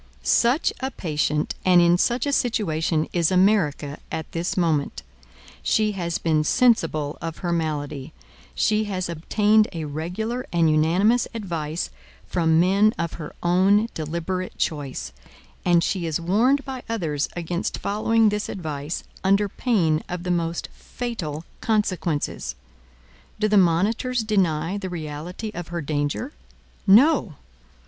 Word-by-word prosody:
Such 240 - +3
a 260 +1 -2
patient 150 - -1
and 180 -1 +6
in 175 0 +5
such 240 +9 +1
a 285 - 0
situation 165 - 0
is 170 -2 +2
America 180 -7 +2
at 160 -1 -5
this 170 +3 -2
moment. 160 -5 0 0.6
She 215 - +2
has 170 -4 -2
been 155 -2 +1
sensible 165 - +2
of 165 -1 -5
her 175 - 0
malady. 150 -3 -3 0.4
She 215 0 +2
has 185 -3 -3
obtained 210 +6 +3
a 165 -2 -4
regular 180 - -3
and 170 -2 +3
unanimous 180 +10 +3
advice 170 -6 -3 0.3
from 160 -2 +2
men 200 +5 +4
of 170 -1 -2
her 150 - -8
own 195 +5 +3
deliberate 170 +4 -4
choice. 145 - -3 0.5
And 175 -1 +4
she 180 -2 -1
is 160 0 -1
warned 230 +11 +2
by 265 -2 -5
others 160 -10 -1
against 175 +1 -3
following 220 +2 +2
this 210 0 -2
advice 155 -4 -4 0.2
under 200 +2 +3
pain 180 -9 +1
of 180 -1 -4
the 180 - -1
most 170 -1 -1
fatal 170 -11 -5
consequences. 185 - -1 0.8
Do 215 - +2
the 210 - +2
monitors 205 +7 +2
deny 185 -3 0
the 190 -2 -5
reality 170 +5 -6
of 175 -2 -6
her 170 0 -4
danger? 145 - -2 0.5
No. 220 - +5
175 Hz, 135 wpm, -24 LUFS, 160-210 Hz, 0.8 s, and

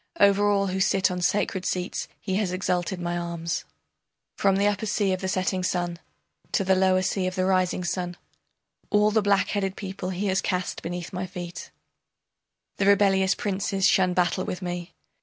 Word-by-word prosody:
Over 200 +1 +5
all 200 -1 +2
who 190 0 -2
sit 190 0 +2
on 180 0 -3
sacred 190 0 0
seats 180 0 -2
he 190 -2 -2
has 200 -4 0
exalted 180 0 -1
my 175 0 -2
arms, 170 -1 -3 0.7
From 195 -1 +2
the 200 +1 +2
upper 205 +1 0
sea 200 -2 +1
of 185 - -3
the 190 - -2
setting 185 0 0
sun 175 -1 -1 0.5
To 195 - +2
the 190 0 +3
lower 185 0 +3
sea 185 0 0
of 185 - -3
the 185 -1 +1
rising 185 -1 +1
sun, 175 0 -3 0.7
All 210 0 +4
the 220 0 +3
blackheaded 200 -1 +1
people 190 -2 -5
he 190 +2 -3
has 190 -1 +1
cast 180 -1 -2
beneath 175 +1 -5
my 185 +1 -3
feet, 175 -1 -7 1.1
The 195 - +1
rebellious 195 -1 +4
princes 195 -1 -1
shun 185 -2 +4
battle 180 +1 +1
with 180 +1 -5
me. 175 -1 -5
185 Hz, 175 wpm, -26 LUFS, 180-195 Hz, 1.1 s, Over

